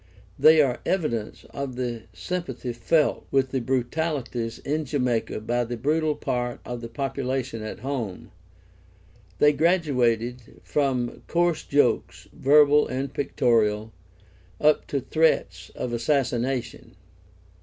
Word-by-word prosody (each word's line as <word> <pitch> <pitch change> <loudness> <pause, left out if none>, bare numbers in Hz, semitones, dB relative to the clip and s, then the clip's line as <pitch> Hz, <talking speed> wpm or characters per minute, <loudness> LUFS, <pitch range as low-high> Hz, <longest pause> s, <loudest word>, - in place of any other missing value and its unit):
They 155 -1 +7
are 125 -3 -1
evidence 135 - -2
of 140 -2 -5
the 120 -3 -4
sympathy 175 -8 -4
felt 145 +7 +1
with 135 -1 +1
the 130 - -1
brutalities 125 -2 -2
in 155 +3 -2
Jamaica 125 -6 -1
by 120 +2 0
the 120 0 -5
brutal 150 +4 +1
part 120 -2 -2
of 120 -1 -5
the 115 - -5
population 130 -2 -3
at 110 0 -7
home. 120 -8 -4 1.1
They 150 0 +5
graduated 125 -8 0
from 130 -4 -1
coarse 175 -1 +1
jokes, 145 +1 +1
verbal 145 +1 +5
and 135 +2 -3
pictorial, 110 -5 +1 0.7
up 150 0 +3
to 140 - -1
threats 110 - +1
of 120 - -4
assassination. 125 -3 -1
130 Hz, 115 wpm, -25 LUFS, 120-150 Hz, 1.1 s, They